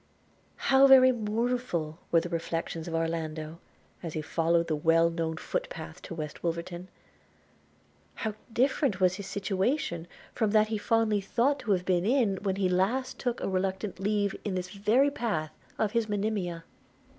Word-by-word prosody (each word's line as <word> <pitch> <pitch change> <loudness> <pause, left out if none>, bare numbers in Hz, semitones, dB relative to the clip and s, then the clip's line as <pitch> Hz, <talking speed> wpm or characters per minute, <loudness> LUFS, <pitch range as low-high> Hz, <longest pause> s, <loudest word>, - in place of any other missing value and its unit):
How 270 0 +5
very 260 -1 +8
mournful 220 -8 -2
were 165 - +5
the 175 - -5
reflections 165 -1 -3
of 165 - -3
Orlando 165 -1 -3 0.4
as 165 -3 -5
he 155 - -2
followed 165 +2 +1
the 155 - 0
well 165 +2 +3
known 165 -1 -2
foot - - -3
path 160 +2 -8
to 170 - -7
West 155 -2 -6
Wolverton! 175 +1 -4 0.7
– - - -35
How 215 - -1 0.2
different 255 -3 +1
was 185 0 +3
his 200 - -7
situation 195 - -1 0.3
from 220 -3 +1
that 215 0 +4
he 220 -1 -1
fondly 220 -1 +2
thought 250 +8 +1
to 215 - -2
have 180 -1 -1
been 180 -2 +2
in 225 -3 +2
when 195 -1 -1
he 195 -1 +1
last 225 +9 0
took 245 -2 -2
a - - -1
reluctant 190 +1 -2
leave, 205 0 0
in 200 -3 -2
this 180 0 -4
very 220 +8 +3
path, 170 - -2 0.3
of 215 -2 0
his 230 -1 0
Monimia! 200 -5 -2
190 Hz, 170 wpm, -29 LUFS, 170-220 Hz, 0.7 s, very